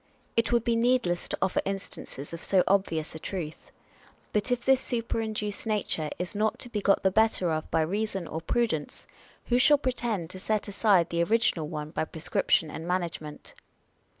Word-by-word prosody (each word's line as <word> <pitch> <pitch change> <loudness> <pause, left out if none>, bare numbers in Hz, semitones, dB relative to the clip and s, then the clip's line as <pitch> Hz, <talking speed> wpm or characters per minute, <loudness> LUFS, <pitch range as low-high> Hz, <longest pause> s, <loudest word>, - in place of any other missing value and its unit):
It 230 0 +2
would 235 -2 +3
be 235 -1 +1
needless 235 -7 +2
to - - -2
offer 190 - +1
instances 190 -6 -6
of 165 - -7
so 190 -2 +4
obvious 185 -5 +1
a 160 - -7
truth. 165 -2 -5 0.6
But 210 +4 +1
if 245 -1 0
this 265 -1 +5
superinduced 220 -3 -2
nature 200 -7 0
is 180 0 -4
not 215 +1 0
to 245 - -5
be 210 -3 -2
got 195 0 +3
the 190 - +4
better 220 -4 +3
of 155 0 -2
by 160 - +2
reason 195 +1 -2
or 160 - -4
prudence, 165 -5 -1 0.4
who 245 0 +2
shall 295 +3 +7
pretend 240 - -2
to 185 - -8
set 215 +2 -1
aside 195 -4 +3
the 170 0 +1
original 185 -5 +2
one 150 -1 -5
by - - -1
prescrip 165 +2 -3
tion 155 -2 +4
and 160 +1 -6
management? 170 -4 -3
195 Hz, 180 wpm, -28 LUFS, 165-225 Hz, 0.6 s, shall